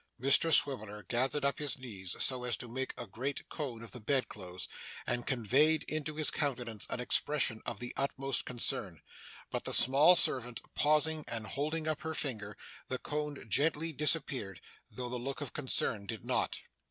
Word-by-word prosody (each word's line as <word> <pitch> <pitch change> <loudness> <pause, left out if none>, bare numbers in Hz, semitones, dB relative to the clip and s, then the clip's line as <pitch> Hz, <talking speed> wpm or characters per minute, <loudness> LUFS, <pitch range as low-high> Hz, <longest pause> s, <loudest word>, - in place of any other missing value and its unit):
Mr 140 +6 +5
Swiveller 110 -9 +3
gathered 130 +6 0
up 140 - 0
his 145 -2 0
knees 100 -8 -6
so 130 -2 -1
as 120 -4 0
to 125 - -6
make 130 +3 -3
a - - -5
great 130 +8 -5
cone 125 -7 -5
of 115 - -10
the 125 - -6
bedclothes, 105 -7 -2 0.4
and 120 0 -1
conveyed 135 +6 +4
into 155 0 -3
his 155 -1 +3
countenance 125 -7 -2
an - - -3
expression 125 -2 +1
of - - -3
the 120 0 -5
utmost 135 0 0
concern. 105 -8 -1 0.5
But - - -3
the - - +4
small 140 +8 +8
servant 125 -7 +2
pausing, 155 +1 +3
and 115 -2 -3
holding 155 +6 -2
up 155 -1 -1
her 160 0 -4
finger, 105 -9 -4 0.3
the 130 - -2
cone 150 -2 -4
gently 160 +6 +2
disappeared, 140 - 0 0.3
though 125 -1 -5
the 125 +1 -3
look 135 +3 -4
of 145 -4 -6
concern 115 -7 -1
did 110 -2 -6
not. - - 0
130 Hz, 170 wpm, -32 LUFS, 115-150 Hz, 0.5 s, small